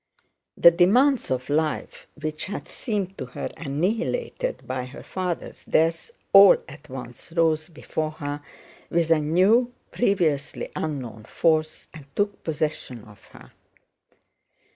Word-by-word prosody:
The 170 - +8
demands 230 - +4
of 130 -1 -1
life, 155 +1 -1
which 155 0 -3
had 200 - -6
seemed 200 -5 -3
to 130 - -4
her 125 - -5
annihilated 210 - -2
by 130 -1 -3
her 130 - -11
father's 180 -2 -4
death, 165 - +1 0.2
all 195 -1 +9
at 145 +1 -13
once 125 +3 -9
rose 160 -1 +2
before 160 -1 -3
her 145 -1 -5 0.5
with 165 -1 +1
a 160 - +5
new, 190 +11 +3 0.2
previously 160 - 0
unknown 125 -8 -4
force 155 -1 +1
and 150 -3 -12
took 205 0 -1
possession 150 -7 -3
of 105 -2 -17
her. - - -16
160 Hz, 125 wpm, -25 LUFS, 145-185 Hz, 0.5 s, all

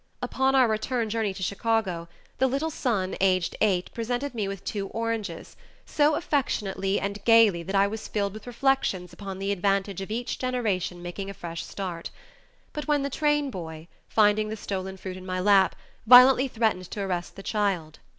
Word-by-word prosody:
Upon 265 0 +1
our 260 -2 +6
return 220 +1 -1
journey 220 -2 0
to 190 0 -6
Chicago, 200 -4 -1 0.3
the 265 - +4
little 280 +5 -1
son 205 -10 -1
aged 185 -3 +2
eight 190 -4 +1
presented 245 +4 -3
me 215 -4 -2
with 195 -1 -6
two 200 -2 -3
oranges, 230 -1 -4 0.3
so 300 0 +2
affectionately 205 - -1
and 200 0 -4
gayly 225 -6 +5
that 195 +4 -4
I 195 0 +5
was 215 +2 -5
filled 200 -2 -1
with 215 +2 -10
reflections 240 -8 0
upon 195 0 -7
the 195 +1 -2
advantage 195 0 0
of 195 - -6
each 235 +3 -3
generation 205 -9 -1
making 195 +3 -5
a 200 - -7
fresh 170 -1 -6
start, 180 -4 -5 0.8
when 295 -2 +2
the 280 - -2
train 295 -1 +1
boy, 160 -4 -7 0.2
finding 215 0 +3
the 220 - -4
stolen 190 -2 -4
fruit 185 -1 -7
in 185 - -10
my 185 0 -2
lap, 195 0 +4 0.3
violently 255 +2 +8
threatened 220 -7 -1
to 205 - -5
arrest 180 -3 -3
the 195 - -10
child. 190 -9 -1
205 Hz, 175 wpm, -26 LUFS, 190-235 Hz, 0.8 s, violently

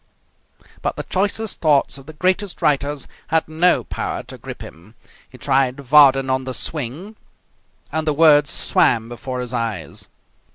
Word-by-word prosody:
But - - -2
the - - -5
choicest 205 +2 -1
thoughts 145 -3 +2
of 135 - -16
the 155 - -9
greatest 185 +3 -1
writers 145 -1 0 0.2
had 160 0 +1
no 165 +3 +2
power - - -4
to - - -11
grip - - -8
him. 90 +8 -14 0.3
He 130 - -14
tried 135 -1 +1
Vardon 135 -1 +5
"On 130 0 0
the 130 -1 -3
Swing", 160 - -4 0.8
and 160 0 -2
the - - +3
words 150 -2 +5
swam 115 -2 +2
before 125 +1 -5
his 125 0 -6
eyes. 115 -3 -4
140 Hz, 155 wpm, -20 LUFS, 130-160 Hz, 0.8 s, Vardon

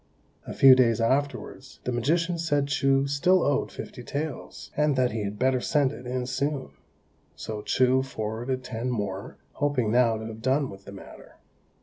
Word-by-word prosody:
A - - -5
few 135 -1 +8
days 120 -3 +3
afterwards 135 +5 -2
the 125 - -2
magician 165 +8 0
said 145 -4 0
Chou 135 -1 +2
still 170 +6 +3
owed 145 -1 0
fifty 125 - -8
taels, 145 +3 -6
and 150 -1 +2
that 130 -1 +2
he 110 0 -3
had 100 +1 -4
better 130 +2 +1
send 145 -3 +2
it 125 - -9
in 125 0 -2
soon; 135 - -2 0.6
so 110 -1 -6
Chou 130 +4 +2
forwarded 125 +1 -4
ten 125 0 -4
more, 100 -5 -4
hoping 140 -7 0
now 120 -2 +3
to 110 - -7
have 110 0 -8
done 135 +2 +1
with 95 0 -13
the - - -9
matter. 100 - -13
130 Hz, 175 wpm, -26 LUFS, 115-140 Hz, 0.6 s, few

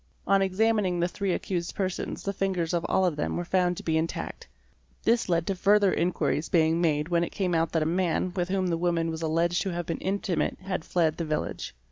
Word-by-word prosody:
On 195 0 +4
examining 195 -1 +1
the 175 - +2
three 195 +1 -2
accused 175 -1 -2
persons 190 -2 -3
the 200 - -2
fingers 185 -4 -1
of 170 -1 0
all 190 - +3
of 175 -4 +1
them 150 - -1
were 175 - -3
found 180 -1 +1
to - - -7
be 160 -1 +1
intact. 165 +1 -4 0.6
This 230 -3 +2
led 170 -1 +2
to 195 - 0
further 200 +1 +4
inquiries 170 -2 0
being 165 0 +3
made 150 -1 +1
when 170 -1 +2
it - - -2
came 185 -3 -1
out 165 -1 +1
that 160 -2 +2
a 165 +3 0
man 180 +1 0
with 180 -1 -1
whom 190 -1 0
the 170 -2 0
woman 170 -1 +1
was 160 0 -5
alleged 165 +2 +1
to 195 - -1
have 175 -1 -3
been 165 - -3
intimate 190 -2 -1
had 185 -3 -3
fled 160 -3 +1
the 170 - -2
village. 155 - -3
175 Hz, 225 wpm, -27 LUFS, 165-190 Hz, 0.6 s, On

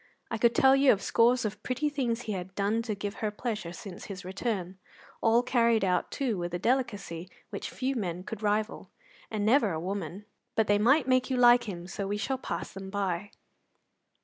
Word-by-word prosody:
I 225 - -2
could 235 +1 +4
tell 265 0 +6
you 275 -1 +6
of 200 - 0
scores 240 +1 +3
of 210 -1 -4
pretty 255 +6 -1
things 250 -5 -1
he 220 - -4
had 190 -1 -5
done 205 +3 +1
to 215 - 0
give 200 +1 -5
her 215 - +1
pleasure 210 -4 -4
since 180 +1 -9
his 190 -2 -8
return, 190 -1 -3 0.4
all 230 +1 +4
carried 235 -4 +3
out, 180 -2 +1
too, 240 -8 -1
with 175 0 -3
a - - 0
delicacy 200 -7 -1 0.2
which - - -4
few 265 +1 -2
men 180 -6 -3
could 195 - -7
rival, 210 +1 -1 0.4
and 210 -2 -2
never 225 -2 +4
a 160 - -2
woman; 195 +2 -4 0.3
but 220 - +3
they 205 0 +3
might 260 +7 +4
make 255 -1 +3
you 260 - 0
like 240 0 +6
him, 175 -5 -6
so 195 +2 -4
we 205 +1 -1
shall 260 +6 -2
pass - - -5
them 190 0 -7
by. 195 -1 -2
210 Hz, 200 wpm, -29 LUFS, 190-240 Hz, 0.4 s, tell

